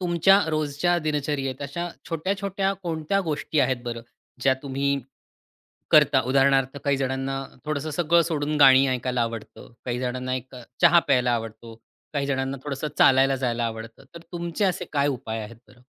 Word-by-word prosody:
तुमच्या 180 +2 +4
रोजच्या 155 +3 0
दिनचर्येत, 145 -4 -2
अशा 170 +5 -4 0.2
छोट्या-छोट्या 195 +3 -1
कोणत्या 165 +3 -1
गोष्टी 155 0 -1
आहेत 130 -2 0
बरं, 120 -1 -5 0.4
ज्या 130 +1 +3
तुम्ही 140 0 -2 1.0
करता? 150 -3 +5
उदाहरणार्थ, 135 0 +2
काही 140 -1 +2
जणांना 135 0 -2 0.2
थोडंसं 155 0 -3
सगळं 170 +2 +3
सोडून 155 -2 -2
गाणी 135 -1 +7
ऐकायला 125 -1 -1
आवडतं. 115 0 -7
काही 120 -1 -2
जणांना 130 0 -2
एक 130 +1 -7
अ, 125 - -9 0.2
चहा 170 - +6
प्यायला 125 -2 +3
आवडतो. 115 0 -6 0.4
काही 140 -2 -1
जणांना 135 0 -2
थोडंसं 145 +1 -3
चालायला 135 0 +5
जायला 120 -2 -1
आवडतं. 115 +2 -6
तर 170 - -9
तुमचे 170 +3 -2
असे 185 -3 0
काय 145 -1 +2
उपाय 115 -5 -4
आहेत 110 +1 -10
बरं? 125 -1 -20
135 Hz, 155 wpm, -24 LUFS, 130-155 Hz, 1.0 s, गाणी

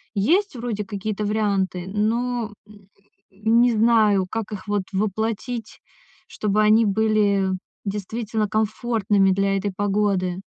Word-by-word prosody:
Есть 345 - +2
вроде 230 -3 -3
какие-то 210 0 -4
варианты, 200 -4 0
но, 225 +2 -1
м, 205 -2 -17 0.4
не 225 +5 +3
знаю, 215 -3 +3
как 220 -1 -4
их 205 0 -7
вот 205 -2 0
воплотить, 220 +3 -3 0.5
чтобы 210 0 0
они 215 +1 +5
были 205 -2 +2 0.4
действительно 210 +2 -2
комфортными 215 -2 +1
для 195 +1 +1
этой 200 +1 -2
погоды. 195 -2 0
210 Hz, 115 wpm, -23 LUFS, 195-220 Hz, 0.5 s, они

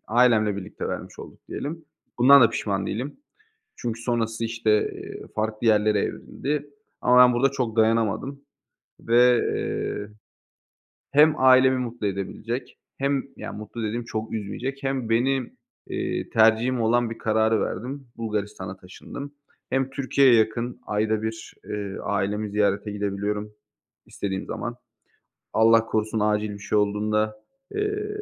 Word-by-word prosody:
ailemle 110 -3 +3
birlikte 100 - -6
vermiş - - -6
olduk - - -11
diyelim. 160 +3 -5 0.3
Bundan 140 +3 +8
da 115 - +5
pişman 100 -2 -2
değilim. 135 - -4 0.6
Çünkü 115 -1 -4
sonrası, 115 -2 -1
işte, 115 -1 -1 0.2
eee, - - -8
farklı 110 +1 -2
yerlere 105 -1 +4
evrildi. 145 +6 -3 0.3
Ama 125 0 +5
ben 125 0 +8
burada 135 +3 +3
çok 125 -5 -2
dayanamadım 115 +5 +1 0.6
ve, 120 +1 +5
eee, 105 - -2 1.0
hem 150 +2 +6
ailemi 130 0 +6
mutlu 120 -4 -3
edebilecek 105 +5 -4 0.2
hem, 140 0 0
yani, - - -7
mutlu 110 +2 -6
dediğim 115 +3 -2
çok 110 -1 -4
üzmeyecek 120 +6 -4
hem 135 -4 -2
benim, 125 +2 +1 0.3
iii, - - -3
tercihim 115 +3 +3
olan 120 +1 +2
bir 115 - -6
kararı 110 0 +2
verdim, 130 +6 -4
Bulgaristan'a 105 -4 -4
taşındım. 140 +10 -9 0.4
Hem 135 0 0
Türkiye'ye 135 -1 +3
yakın, 115 +2 0
ayda 110 +1 0
1, 110 0 -5
ııı, 100 -2 -5
ailemi 100 +1 -1
ziyarete 100 0 +1
gidebiliyorum 105 +1 -3 0.5
istediğim 95 -1 -4
zaman. - - -4 0.8
Allah 115 0 +5
korusun 110 0 -1
acil 105 0 +1
bir 100 - -9
şey 105 - -1
olduğunda, 105 +1 +1 0.4
eee, 415 0 -1
115 Hz, 130 wpm, -25 LUFS, 105-125 Hz, 1.0 s, Bundan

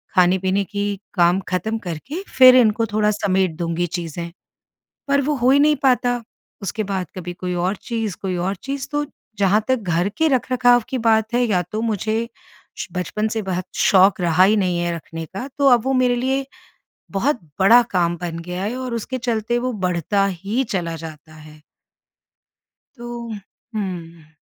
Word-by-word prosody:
खाने-पीने 185 +2 +3
की 200 0 -3
काम 175 0 +3
ख़त्म 185 +5 -1
करके 235 - -5 0.2
फिर 255 -1 +9
इनको 230 -2 +4
थोड़ा 210 0 +3
समेट 190 -4 0
दूँगी 170 0 -1
चीज़ें। 170 0 -5 0.8
पर 280 0 +3
वो 295 +2 0
हो 250 -1 +2
ही 280 - +5
नहीं 300 +1 +4
पाता। 245 -2 +2 0.4
उसके 205 +2 -3
बाद 190 -3 -3
कभी 180 -1 -6
कोई 180 0 -4
और 180 +3 0
चीज़, 225 -3 -4
कोई 185 -2 -2
और 185 +3 -1
चीज़। 275 0 -4
तो 295 0 0 0.3
जहाँ 200 +2 +3
तक 260 - +3
घर 170 +3 +2
के 320 - +3
रखरखाव 250 -3 +3
की 260 - -1
बात 225 -1 +2
है, 245 - +3
या 190 -5 +1
तो 215 - -2
मुझे 220 +1 -1 0.5
श - - -4
बचपन 195 +4 -2
से 220 0 -2
बहुत 185 -2 -3
शौक़ 190 0 +4
रहा 175 +1 +4
ही 205 +3 +5
नहीं 180 -3 +1
है 175 0 -1
रखने 165 0 -7
का, 195 - -7
तो 280 -1 +3
अब 240 -3 +5
वो 270 - +1
मेरे 255 -1 +3
लिए 265 +2 0 0.7
बहुत 240 +7 0 0.2
बड़ा 225 +6 +7
काम 175 -2 +1
बन 170 -1 -4
गया 180 +2 -4
है, 220 +4 -2
और 255 -2 -4
उसके 235 +3 -3
चलते 240 -1 -1
वो 255 +1 -2
बढ़ता 180 +3 +1
ही 200 +7 -1
चला 170 -3 -2
जाता 155 -1 -10
है। 155 0 -14 1.4
तो, 240 -1 -7 0.5
हुँ। 170 -6 -6
200 Hz, 175 wpm, -21 LUFS, 180-240 Hz, 1.4 s, फिर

